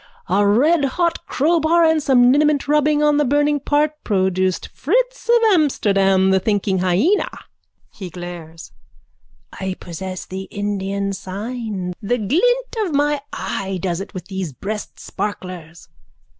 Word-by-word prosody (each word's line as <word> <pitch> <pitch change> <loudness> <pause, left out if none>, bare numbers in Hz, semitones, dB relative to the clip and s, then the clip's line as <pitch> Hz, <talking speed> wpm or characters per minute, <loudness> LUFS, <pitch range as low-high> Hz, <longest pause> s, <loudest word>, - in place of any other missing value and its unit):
A 195 +3 +2
redhot 305 - +2
crowbar 330 +2 +3
and 320 -1 +3
some 250 -3 +5
liniment 295 0 +2
rubbing 300 0 +2
on 295 -1 +3
the 295 - +3
burning 290 +2 +2
part 300 +2 0
produced 190 -2 0
Fritz - - -1
of 475 - +6 0.2
Amsterdam, 195 - +3
the 190 - +4
thinking 200 -1 0
hyena. 190 - +2 0.6
(He 190 -3 -8
glares.) 175 -2 -9 0.8
I 190 -1 -4
possess 185 +2 -6
the 190 +1 -6
Indian 200 -1 -2
sign. 200 -1 -5
The 240 +4 0
glint 485 - +1
of 370 -9 -1
my 290 0 +1
eye 195 -1 -3
does 175 0 -2
it 200 - -9
with 180 -2 -6
these 190 -6 -5
breastsparklers. 185 -2 -6
210 Hz, 130 wpm, -20 LUFS, 190-295 Hz, 0.8 s, of